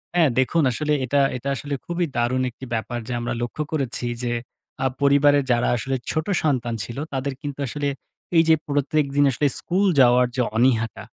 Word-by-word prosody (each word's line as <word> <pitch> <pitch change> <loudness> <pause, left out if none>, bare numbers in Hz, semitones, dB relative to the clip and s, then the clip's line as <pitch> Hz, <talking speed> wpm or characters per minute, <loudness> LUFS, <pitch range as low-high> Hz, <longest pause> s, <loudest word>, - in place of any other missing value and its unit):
হ্যাঁ, 165 -4 +5
দেখুন 155 +5 +2
আসলে 150 +4 -1
এটা 140 +3 +1 0.2
এটা 140 +3 -4
আসলে 145 +2 -5
খুবই 175 0 -1
দারুণ 120 +2 +1
একটি 130 +2 -11
ব্যাপার। 120 +2 -2
যা 125 - -3
আমরা 120 - -2
লক্ষ্য 120 +5 -3
করেছি 135 -5 -2 0.2
যে, 120 - -1 0.5
আ - - +1 0.2
পরিবারের 140 0 +4
যারা 120 0 +2
আসলে 135 +4 -2 0.2
ছোট 155 0 -1 0.2
সন্তান 125 -6 0
ছিল, 120 +1 -7 0.2
তাদের 135 +1 -2
কিন্তু 145 -2 -6
আসলে 145 +3 -3 0.5
এইযে 165 0 +6
প্রত্যেকদিন 145 0 +1
আসলে 145 +4 +1
স্কুল 190 +3 0
যাওয়ার 125 0 +6
যে 130 - +1
অনীহাটা, 115 -4 +1
135 Hz, 170 wpm, -23 LUFS, 120-145 Hz, 0.5 s, এইযে